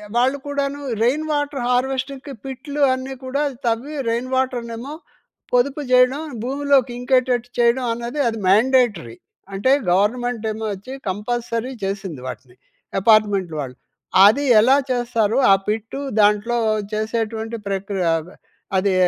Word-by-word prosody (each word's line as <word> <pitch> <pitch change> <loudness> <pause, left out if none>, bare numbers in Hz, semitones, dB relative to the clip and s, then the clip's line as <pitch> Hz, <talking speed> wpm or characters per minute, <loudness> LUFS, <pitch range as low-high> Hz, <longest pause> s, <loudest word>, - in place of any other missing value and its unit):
వాళ్ళు 260 +3 +2
కూడాను 285 0 -2 0.2
rain 280 +6 +1
water 290 -3 -1
హార్వెస్టింగ్‌కి 265 +2 -1
పిట్లు 280 +2 -5
అన్నీ 260 +1 -5
కూడా 280 +3 -1 0.2
తవ్వి 240 +6 -1
రెయిన్ 235 +2 -2
వాటర్‌నేమో 250 +1 -2 0.6
పొదుపు 270 +4 +2
చేయడం 255 +3 +4 0.2
భూమిలోకి 275 -1 +2
ఇంకేటట్టు 250 -1 +1
చేయడం 240 +2 +3
అన్నది 240 +5 -5
అది 225 -1 -2
మాండేటరీ. 215 - +3 0.4
అంటే 200 +7 +1 0.2
గవర్నమెంటేమో 220 +2 0
వచ్చి 205 +7 -9 0.2
కంపల్సరీ 230 +4 -3
చేసింది 195 -8 -4
వాటిని. 125 -1 -9 0.5
అపార్ట్మెంట్ 205 -4 +3
వాళ్ళు. 130 -3 -5 0.5
అది 275 +8 +3 0.2
ఎలా 255 +5 +5 0.2
చేస్తారో 240 -2 0
ఆ - - +9
పిట్టు 225 +5 -3 0.2
దాంట్లో 210 +3 +2 0.4
చేసేటువంటి 225 +1 -2
ప్రక్రియ 195 -2 -2
ఆహ్, 165 +2 -5 0.5
అది 190 0 +2
240 Hz, 115 wpm, -21 LUFS, 210-265 Hz, 0.6 s, ఆ